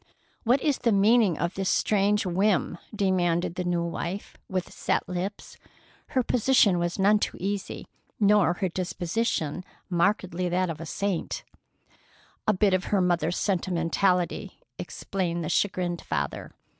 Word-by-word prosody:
"What 245 +4 +3
is 290 -4 +1
the 235 - +2
meaning 210 -2 +4
of 170 +1 -1
this 190 -1 -1
strange 205 0 +2
whim?" 185 -1 +1
demanded 180 -5 +1
the 180 - -3
new 175 -1 0
wife, 170 +3 -4
with 185 -2 -3
set - - -1
lips. 185 +3 -5 0.6
Her 255 - +4
position 230 -6 +3
was 175 0 -1
none 205 +2 +4
too - - -2
easy, 200 +1 -3 0.3
nor 205 -4 +4
her 185 +1 -2
disposition 180 -1 -2 0.3
markedly 180 0 +1
that 180 0 +1
of 160 0 -8
a 165 - -6
saint. 195 -1 -2 1.0
"A - - +6
bit 195 0 +2
of 185 0 +1
her 205 - +1
mother's 175 -1 +1
sentimentality," 180 -1 0 0.2
explained 175 -3 -3
the 155 - -3
chagrined 180 -3 0
father. - - -4
185 Hz, 140 wpm, -27 LUFS, 175-205 Hz, 1.0 s, A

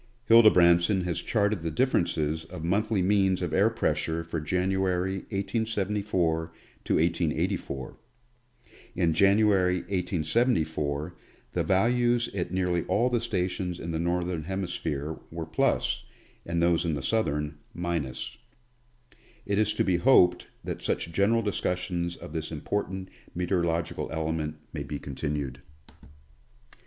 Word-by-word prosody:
Hildebrandsson 90 -4 +6
has 85 -2 -2
charted 105 -4 0
the 80 - -2
differences 80 - 0
of 80 - -8
monthly 100 +3 +1
means 95 -1 +3
of 90 - -3
air 100 +4 +4
pressure 80 -6 -1
for 85 -1 -4
January, 95 +2 0
1S74 100 -5 -1 0.4
to - - +1
1884. 85 -3 -1 1.0
In 80 -2 +2
January, 100 0 +4
1874, 85 - 0 0.4
the - - 0
values 120 +4 +2
at 90 -4 -3
nearly 90 -2 +1
all 120 +4 +1
the 120 -2 +1
stations 90 -5 -2
in 85 - -5
the 80 - -2
Northern 85 -1 -1
Hemisphere, 85 -5 -3
were 80 0 -5
plus, 80 0 0 0.4
and 85 0 0
those 85 0 +3
in 80 -3 0
the 70 - -5
Southern, 75 -8 -1 0.2
minus. 80 -8 -3 1.1
It 100 0 0
is 105 0 +3
to - - +2
be 90 -2 +2
hoped 90 -5 +4 0.2
that - - -5
such 85 - -1
general 105 +6 +2
discussions 90 -3 -1
of - - -10
this 80 -1 -4
important 95 +4 -3 0.3
meteorological 85 -2 -1
element 80 -1 -2 0.2
may 75 - -4
be 70 +1 -4
continued. 70 -2 -4
90 Hz, 125 wpm, -27 LUFS, 80-100 Hz, 1.1 s, Hildebrandsson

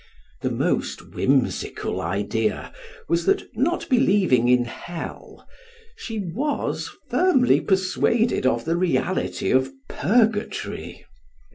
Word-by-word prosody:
The - - 0
most - - -2
whimsical - - 0
idea 105 +2 -2 0.3
was, 170 0 0
that - - +3
not 315 +10 0
believing 195 - +3
in 125 0 +4
hell, 165 +8 -8 0.5
she 235 - -6
was 215 - -2 0.2
firmly 300 -10 +3
persuaded 190 - +1
of 120 -2 0
the 165 +1 +1
reality 185 +1 0
of 130 +1 +2 0.2
purgatory. 215 - 0
185 Hz, 100 wpm, -23 LUFS, -, 0.5 s, in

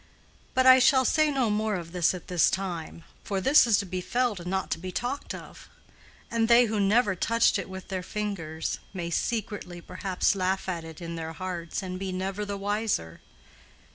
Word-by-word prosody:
"But 260 - +3
I 260 0 +9
shall 260 +1 +5
say 310 +2 +3
no 260 -6 +1
more 215 0 0
of 170 -2 -6
this 180 0 +2
at 180 - -10
this 180 -3 +3
time; 175 -4 -4 0.2
for 200 -3 -2
this 270 +6 +6
is 220 -3 +4
to 200 - -1
be 185 0 -4
felt 240 0 0
and 175 +1 -6
not 190 0 -2
to - - -1
be 185 +2 -6
talked 245 +8 -3
of; - - -12 0.6
and 230 -1 +2
they 240 +1 +7
who 220 -2 -1
never 205 +1 +3
touched 230 +6 +2
it - - -6
with 190 0 -8
their 190 -2 -2
fingers 180 -6 -4 0.2
may 170 -2 -4
secretly 205 -3 -2
perhaps 185 +1 -1
laugh 190 0 -1
at 170 -3 -3
it 160 +1 -10
in 170 0 -5
their 160 0 -5
hearts 180 +1 -4
and 185 0 -5
be 190 -1 -3
never 190 +3 -3
the 200 0 -4
wiser." 205 - -2
190 Hz, 200 wpm, -27 LUFS, 180-220 Hz, 0.6 s, I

